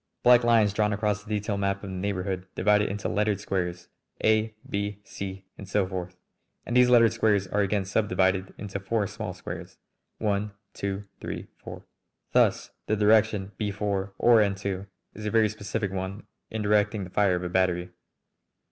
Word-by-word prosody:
Black 125 0 +7
lines 115 -4 +4
drawn 105 0 +1
across 105 0 -1
the 105 - -14
detail 105 -1 -1
map 100 0 -1
of 100 - -6
the - - -5
neighbourhood 95 -1 -2
divide 105 +2 +4
it - - 0
into 105 +1 -3
lettered 105 -1 +1
squares, 90 -3 -3 0.4
A, 110 0 +2
B, 100 0 -2
C, 95 -1 -7
and 100 - -9
so 100 -1 +2
forth, 90 -1 -6 0.5
and 120 - -3
these 125 0 +6
lettered 115 -2 +6
squares 105 -4 +2
are 105 +2 0
again 100 0 0
subdivided 95 -2 +1
into 100 -1 -5
four 105 +2 0
small - - -5
squares, - - -8 0.4
1, 105 -1 -1 0.2
2, 100 0 -3 0.2
3, - - -6
4. - - -10 0.5
Thus - - +2 0.2
the 110 - +2
direction 105 -1 +3
B 105 - -1
4, 100 -1 -2
or 120 -2 +6
N 100 -2 +2
2, 95 0 -4 0.3
is 105 0 -6
a - - +1
very 110 -1 +3
specific 100 -1 -3
one 95 +2 -5 0.2
in 110 -1 -3
directing 105 0 +2
the 90 - -9
fire 100 -2 +3
of 90 - -3
a 90 - -3
battery. 90 -1 +1
100 Hz, 180 wpm, -27 LUFS, 95-105 Hz, 0.5 s, Black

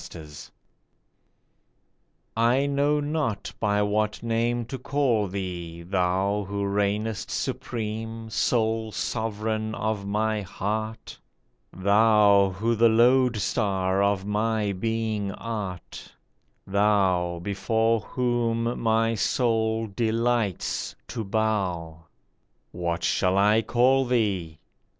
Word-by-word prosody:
THE - - -10
NAME 75 -1 -11 2.1
I 120 +4 +3
KNOW 140 +1 +1
not 145 -8 -2
by 105 -1 +1
what 105 +2 -1
name 115 +1 0
to 130 +3 -6
call 125 -6 +1
thee, 90 -3 -5
thou 95 +3 0
Who 100 0 -2
reignest 105 +2 -1
supreme, 110 0 -4
sole 110 -1 0
sovereign 110 0 -2
of 110 -2 -2
my 105 +1 0
heart! 110 +4 -4 0.5
Thou 100 0 +4
who 110 +5 -1
the 115 +1 +4
lode 120 +1 +4
star 95 -1 0
of 100 -1 +1
my 105 0 0
being 110 0 -2
art. 100 -6 -6 0.5
Thou 95 -4 +2
before 110 +4 +1
whom 120 0 -1
my 115 0 +2
soul 110 0 +1
delights 115 -1 -1
to 115 - -4
bow! 95 -7 -2 0.6
What 85 -1 -3
shall 95 +2 +1
I 105 +3 +4
call 130 +3 +3
thee 100 -10 0
110 Hz, 100 wpm, -25 LUFS, 100-115 Hz, 2.1 s, Thou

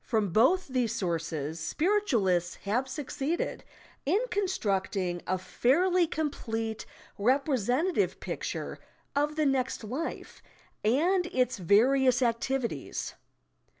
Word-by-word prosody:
Prom 220 -4 +1
both 260 - +4
these 250 -4 0
sources 165 -5 -2
spiritualists 230 - +1
have 240 +7 0
succeeded 280 +3 -3 0.4
in 345 +9 +2
constructing 195 - -1
a 185 - +1
fairly 345 - +2
complete 225 -8 -3 0.3
representative 270 - +1
picture - - -4 0.4
of 295 +1 +1
the 310 -1 +1
next 265 -4 0
life 265 +10 -5 0.4
and 345 - +2
its 255 - 0
various 250 +7 +4
activities. 235 - -1
255 Hz, 95 wpm, -29 LUFS, 205-300 Hz, 0.4 s, both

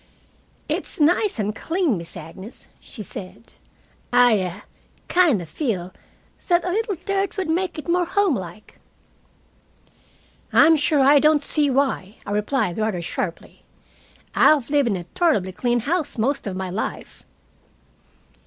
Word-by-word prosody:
"It's - - -3
nice 350 - +2
and 210 0 -2
clean, 330 - 0
Miss 170 0 -7
Agnes," 180 +7 -11
she 215 - -9
said. 195 +3 -10 0.6
"A - - -2 0.3
I 190 +4 -9 0.4
kind 340 - +3
of - - -11
feel 185 - -3 0.5
that 350 -1 +2
a 360 - -1
little 430 +1 -1
dirt 390 +3 -2
would 380 -3 -2
make 355 +3 -1
it 310 - -7
more 350 +1 +2
homelike." 245 - -2 1.7
"I'm 325 0 +6
sure 295 -1 +2
I 285 +2 +6
don't 300 0 +3
see 295 0 +2
why," 260 -7 0
I - - -5
replied, 210 -2 -1
rather 215 -4 -1
sharply, 170 0 -5 0.7
"I've 285 -4 +4
lived 285 -3 +3
in 200 - 0
a 175 - -6
tolerably 205 - 0
clean 240 +5 0
house 310 +3 -2
most 250 +2 -1
of 190 - -4
my 190 -1 -4
life." 205 +5 -5
275 Hz, 140 wpm, -22 LUFS, 200-330 Hz, 1.7 s, I'm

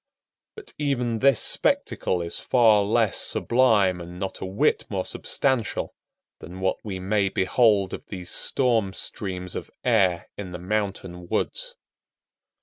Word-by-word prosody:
But 430 -1 -11
even 125 -6 -1
this 135 -2 +4
spectacle 90 -2 +1
is 85 - -3
far 115 -4 +4
less 110 0 +1
sublime 105 -8 +2
and 85 +1 -9
not 95 0 -4
a - - -3
whit 95 +2 +1
more - - -2
substantial 130 -5 -1 0.5
than 90 +3 -10
what 95 0 0
we 95 -3 -5
may 100 +1 0
behold 100 0 +2
of - - -8
these 90 -3 -6
storm 115 -7 +2
streams 90 -3 -2
of - - -6
air 100 -6 +2
in 90 -3 -6
the - - -4
mountain 95 -2 -3
woods. - - -2
100 Hz, 140 wpm, -24 LUFS, 95-120 Hz, 0.5 s, this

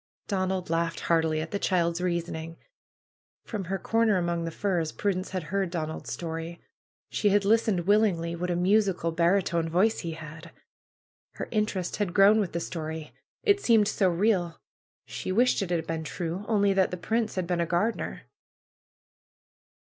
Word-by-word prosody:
Donald 185 -3 -1
laughed 165 0 0
heartily 160 -2 +1
at 160 - -6
the 200 - -2
child's 170 -3 +1
reasoning. 165 -2 -3 0.9
From 210 -5 -5
her 195 +3 -2
corner 225 -1 +2
among 170 -1 -1
the - - -2
firs 170 -2 -1
Prudence 190 -2 -2
had 185 -2 -3
heard 195 -2 +1
Donald's 160 -2 -4
story. 165 0 -5 0.5
She 210 - +2
had 200 0 +3
listened 215 -3 +3
willingly. 180 -4 +2
What 180 +1 -3
a 175 - +1
musical 185 -2 +2
baritone 170 0 +1
voice 195 +7 +2
he 165 -1 -4
had! 160 +1 -10 0.8
Her - - -5
interest 210 -5 -1
had 200 -4 -2
grown 205 +2 +6
with 195 -5 -1
the 170 - -1
story. 160 -2 -5 0.3
It 405 -2 +3
seemed 225 - +4
so 195 -3 +2
real. 175 -2 +1 0.5
She - - -5
wished 245 +5 +3
it 195 - -2
had 170 -2 -1
been 160 0 -3
true; 175 +4 -4
only 200 -3 +3
that 190 -1 +3
the 180 - -4
prince 220 +6 -1
had 185 -2 -1
been 175 0 0
a 170 - 0
gardener. 180 +8 -1
180 Hz, 165 wpm, -27 LUFS, 165-200 Hz, 0.9 s, grown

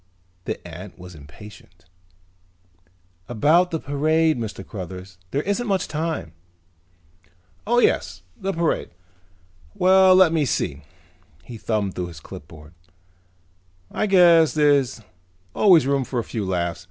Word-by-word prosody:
The - - -5
ant 90 +4 -10
was 90 0 -12
impatient. 85 +3 -15 1.4
"About 155 +10 +3
the 165 -2 -3
parade, 155 +3 +1
Mr. 110 -4 -6
Cruthers, 95 -2 -9
there 140 +8 -2
isn't 205 +5 -2
much 195 -2 0
time." 155 - -4 1.3
"Oh, 240 +2 +2
yes, 245 - +1
the 195 -1 -3
parade. 165 -2 -1 0.9
Well, 190 0 +5
let 185 -3 +5
me 160 -2 +2
see," 75 - -2 0.6
he 115 +5 -10
thumbed 105 -2 -2
through 90 -1 -4
the 80 - -12
clipboard, 75 +2 -13 1.2
"I 215 - -1
guess 170 -5 +5
there's 140 -5 +2 0.5
always 180 -9 +5
room 140 0 +1
for 125 - -5
a 120 - 0
few 110 -3 -5
laughs. 85 -2 -2
135 Hz, 125 wpm, -22 LUFS, -, 1.4 s, Well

